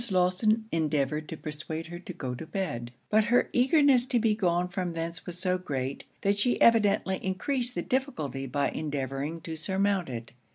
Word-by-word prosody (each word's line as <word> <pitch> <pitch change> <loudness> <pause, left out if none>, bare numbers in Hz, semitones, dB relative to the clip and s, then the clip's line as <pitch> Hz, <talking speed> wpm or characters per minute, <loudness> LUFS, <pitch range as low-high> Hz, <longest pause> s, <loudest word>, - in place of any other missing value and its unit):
Lawson 190 +4 +2
endeavoured 150 -1 0
to 160 - -5
persuade 155 +1 -5
her 175 +1 -7
to 180 - -8
go 135 -8 -4
to 160 +6 -7
bed; 145 -12 -3 0.2
but 215 0 +5
her 240 +2 +3
eagerness 265 0 +5
to 255 -2 +1
be 225 -2 +3
gone 180 -4 +1
from 180 -1 -3
thence 165 +1 -5
was 175 -1 -4
so 185 0 +1
great, 135 -6 -3 0.2
that 200 +1 +2
she 245 +4 +2
evidently 205 -4 +4
encreased 245 +6 -1
the - - -1
difficulty 155 - -2
by 140 +2 0
endeavouring 145 +1 -3
to 160 0 -5
surmount 190 +1 0
it. 115 -2 -6
180 Hz, 175 wpm, -28 LUFS, 150-210 Hz, 0.2 s, but